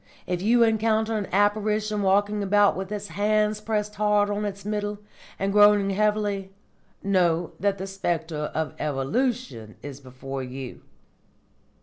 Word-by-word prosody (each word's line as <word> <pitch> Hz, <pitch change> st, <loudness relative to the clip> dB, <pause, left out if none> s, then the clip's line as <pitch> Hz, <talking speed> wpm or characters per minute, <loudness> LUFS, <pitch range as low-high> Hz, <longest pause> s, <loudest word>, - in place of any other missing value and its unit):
If 180 Hz, -1 st, -2 dB
you 235 Hz, +4 st, +4 dB
encounter 220 Hz, 0 st, +1 dB
an 205 Hz, -3 st, -2 dB
apparition 210 Hz, +1 st, +1 dB
walking 205 Hz, +2 st, +2 dB
about 205 Hz, +1 st, +3 dB
with 190 Hz, 0 st, -5 dB, 0.2 s
hands 210 Hz, +1 st, +1 dB
pressed 210 Hz, -1 st, -2 dB
hard 210 Hz, 0 st, +2 dB
on 205 Hz, +1 st, -2 dB
its 200 Hz, -1 st, -6 dB
Middle, 210 Hz, 0 st, -2 dB, 0.4 s
and 195 Hz, +1 st, -1 dB
groaning 205 Hz, -1 st, +5 dB
heavily, 205 Hz, -1 st, 0 dB, 0.5 s
know 175 Hz, -4 st, +1 dB
that 200 Hz, 0 st, +1 dB
the 190 Hz, -, -5 dB
spectre 165 Hz, -5 st, -3 dB
of 160 Hz, -1 st, -2 dB
Evolution 150 Hz, -, -2 dB
is 140 Hz, -2 st, -8 dB
before 135 Hz, 0 st, -7 dB
you." 130 Hz, 0 st, -7 dB
205 Hz, 130 wpm, -25 LUFS, 175-210 Hz, 0.5 s, groaning